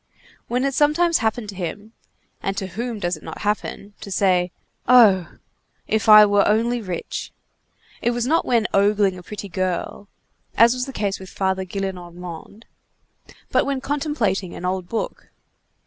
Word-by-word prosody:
When 250 +2 0
it 275 - 0
sometimes 315 +4 +3
happened 220 -1 -1
to 200 - -7
him—and 195 +1 -7
to 190 - -2
whom 230 +5 -4
does 175 -3 -1
it 155 - -14
not - - -8
happen?—to 205 -1 -4
say: 185 -2 +2 0.4
"Oh! 215 -8 +5 0.5
if 220 0 0
I 215 0 +10
were 205 -1 +3
only 230 +3 +1
rich!" 185 -5 -5 0.7
it - - +1
was 240 0 -1
not 320 +6 +2
when 235 -3 +1
ogling 200 -1 +3
a 180 - -9
pretty 205 +3 -7
girl, 185 +2 -3 0.5
as 230 +1 +6
was 250 0 -3
the - - -5
case 205 -5 -2
with 190 -1 -10
Father 190 -1 -1
Gillenormand, 180 +1 -7 0.9
but - - +3
when 275 -1 -2
contemplating 260 - -2
an 180 - -6
old 185 -1 -2
book. 230 - -4
205 Hz, 150 wpm, -22 LUFS, 190-235 Hz, 0.9 s, I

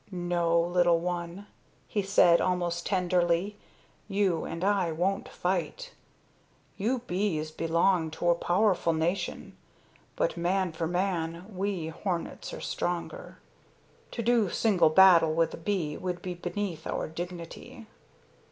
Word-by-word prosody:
"No, 175 -2 +1
little 175 0 +3
one," 175 +2 -4 0.4
he 205 - -1
said 190 -3 +4
almost 175 -1 -1
tenderly, 180 +1 +1 0.5
"you 195 -5 0
and 165 +2 -5
I 195 -4 +2
won't 180 +5 -1
fight. 190 - -3 0.8
You 235 +4 -1
bees 175 -6 -1
belong 165 +1 +1
to 175 - +2
a - - +6
powerful 175 0 +1
nation, 165 +4 -2 0.6
but - - 0
man 180 +1 0
for 160 0 -3
man 175 -1 -2
we 185 -4 -2
hornets 170 +1 -4
are - - -7
stronger. 175 -1 -4 0.7
To 235 - -4
do 230 -4 +3
single 195 -5 +3
battle 165 -2 +6
with 165 0 +1
a - - -6
bee 165 -4 -2
would 180 -1 -4
be 180 - -3
beneath 175 0 -4
our - - -2
dignity. 175 +8 -8
175 Hz, 125 wpm, -28 LUFS, 170-195 Hz, 0.8 s, a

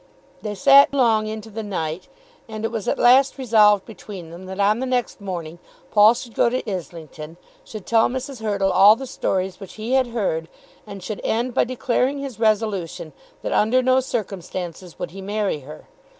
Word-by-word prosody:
They 210 -1 -4
sat 275 +7 +6
long 225 -5 +3
into 220 0 -7
the 220 +2 -5
night, 180 -4 -4 0.4
and 220 0 -5
it - - -2
was 225 -4 -4
at - - 0
last 260 +3 +5
resolved 215 -6 +4
between 195 -6 -10
them 180 +2 -10
that 190 +1 -7
on 210 +3 +3
the 260 - -2
next 250 -4 -2
morning 175 -4 -6 0.3
Paul 215 +2 +6
should 240 -1 -8
go 235 - +3
to 255 0 -3
Islington, 165 -4 -7 0.3
should 215 -4 -9
tell 225 -1 +3
Mrs. 260 -1 -6
Hurtle 200 -3 0
all 195 +4 +7
the 265 - -7
stories 190 -6 -2
which 195 -3 -10
he 220 +3 -5
had 260 -1 +3
heard, 195 -9 -2 0.4
and 200 -2 -9
should 215 +1 -5
end 240 +3 -1
by - - +2
declaring 255 +2 -1
his 275 -5 -7
resolution 210 -8 -1 0.3
that - - -3
under 250 +5 +2
no 255 +1 +4
circumstances 185 -7 -5
would - - -5
he 195 +2 -9
marry 205 -4 -2
her. 150 +3 -12
215 Hz, 185 wpm, -22 LUFS, 185-240 Hz, 0.4 s, all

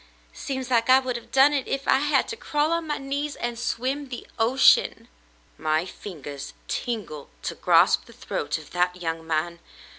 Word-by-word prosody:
Seems 260 -2 -5
like 230 0 +2
I 260 - +9
would 255 -2 -1
have 235 - -8
done 270 +2 +6
it 275 -3 -1
if 275 +1 -3
I 265 - +5
had 290 +1 -1
had 270 - +3
to 450 - -4
crawl 300 -7 0
on 335 -1 -1
my 295 - -1
knees 285 +2 -3
and 240 -1 -4
swim 265 +4 -2
the 245 - -7
ocean." 240 +4 +4 0.5
"My 155 +2 +1
fingers 145 -8 -8
tingle 195 - -4
to - - -2
grasp - - +4
the - - -15
throat - - -3
of - - -13
that 180 0 +1
young 165 -1 -4
man. 165 +2 -1
245 Hz, 185 wpm, -25 LUFS, 175-275 Hz, 0.5 s, I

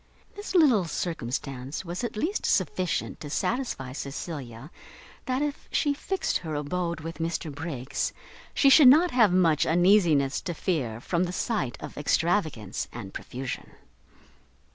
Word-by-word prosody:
This 410 -1 -6
little 260 - +5
circumstance 135 -3 -4
was 175 +6 -4
at 235 - -4
least 355 - -1
sufficient 180 -3 0
to 150 - -7
satisfy 225 - -2
Cecilia 140 -1 -6 0.6
that 260 +2 0
if 290 -1 -4
she 290 - +2
fixed 380 +6 -1
her 160 -3 -5
abode 170 +3 -2
with 165 -1 -7
Mr 165 -2 -2
Briggs, 145 -3 -3 0.4
she 275 - +4
should 275 0 +8
not 320 +7 +7
have 230 -6 +5
much 170 -4 +4
uneasiness 170 -6 +3
to 175 - -4
fear 135 - -2
from 170 +8 0
the 175 - -4
sight 180 - -2
of - - -8
extravagance 155 - 0
and 100 -5 -8
profusion. 130 0 -6
170 Hz, 140 wpm, -27 LUFS, 140-210 Hz, 0.6 s, should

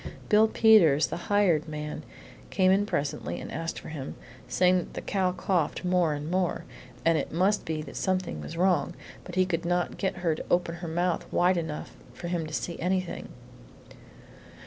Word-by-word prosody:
Bill 215 0 +6
Peters, 200 -11 +5
the - - -4
hired 185 -7 +3
man, 150 0 -5 0.5
came 185 -1 +3
in 200 +2 +3
presently 140 - -2
and - - -7
asked 165 +1 -4
for - - -10
him, 145 -4 -6 0.3
saying 185 0 +3
that 180 - -4
the - - -4
cow 190 -3 0
coughed 180 -2 -1
more 180 -4 +2
and 150 +3 -5
more, 185 -1 0 0.4
and 165 -1 +4
it - - -4
must 190 +5 +1
be 155 -1 -3
that - - -10
something 185 -2 -1
was 165 - -7
wrong, 180 -1 +2 0.3
but 180 - -9
he 185 0 +4
could 170 -2 -2
not 175 +1 -1
get 190 - -1
her 165 - +3
to 155 - -6
open 175 -1 +2
her 175 0 -6
mouth 175 +2 -1
wide 180 +1 +3
enough 160 -3 -4 0.2
for 175 - -6
him 170 -3 -1
to 155 - -9
see 170 - -4
anything. 185 0 -2
175 Hz, 185 wpm, -28 LUFS, 160-185 Hz, 0.5 s, Bill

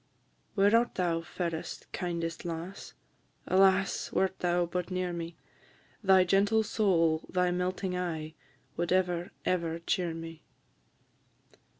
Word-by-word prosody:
Where 205 +2 +5
art 235 +1 +2
thou, 170 -2 0
fairest, 165 -1 -4
kindest 170 -2 -3
lass? 170 +3 -6 0.5
Alas! 190 0 +3
wert 190 0 0
thou 175 0 +2
but 180 +1 -3
near 185 -1 -2
me, 170 0 -5 0.7
Thy 190 -1 +6
gentle 200 +4 +3
soul, 165 -7 +2
thy 180 -1 +2
melting 180 +1 -1
eye, 160 -3 -3 0.4
Would 170 +1 -1
ever, 180 -1 +1 0.2
ever 170 -2 0
cheer 170 0 -1
me. 165 -1 -8
180 Hz, 115 wpm, -30 LUFS, 165-185 Hz, 0.7 s, Thy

